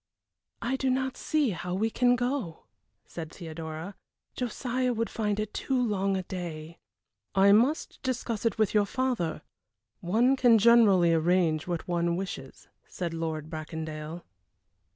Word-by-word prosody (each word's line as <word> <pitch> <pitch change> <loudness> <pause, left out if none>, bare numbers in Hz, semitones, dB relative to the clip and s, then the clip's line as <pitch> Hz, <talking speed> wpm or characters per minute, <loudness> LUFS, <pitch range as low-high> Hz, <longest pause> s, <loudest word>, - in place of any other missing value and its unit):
"I 255 +3 0
do 265 0 0
not 260 0 0
see 300 -7 +1
how 180 +1 -4
we 220 +4 0
can 245 +1 +3
go," 245 - -2 0.4
said 160 -2 -7
Theodora. 160 +1 -7 0.4
"Josiah 250 +1 -1
would 230 0 -2
find 210 -2 -1
it 215 -1 -3
too 265 -2 -1
long 200 -5 +1
a 185 - -3
day." 170 -3 -7 0.6
"I 195 +1 +6
must 245 +9 +2
discuss 245 -4 -2
it 230 -3 0
with 215 -3 +2
your 205 -1 +3
father; 235 -13 -1 0.6
one 230 +9 +3
can 245 -3 +5
generally 205 -6 +6
arrange 165 -1 +2
what 175 +1 -3
one 170 -1 0
wishes," 170 -8 -6 0.2
said 170 -2 -4
Lord 160 -2 -3
Bracondale. 155 +1 -6
195 Hz, 140 wpm, -28 LUFS, 165-240 Hz, 0.6 s, I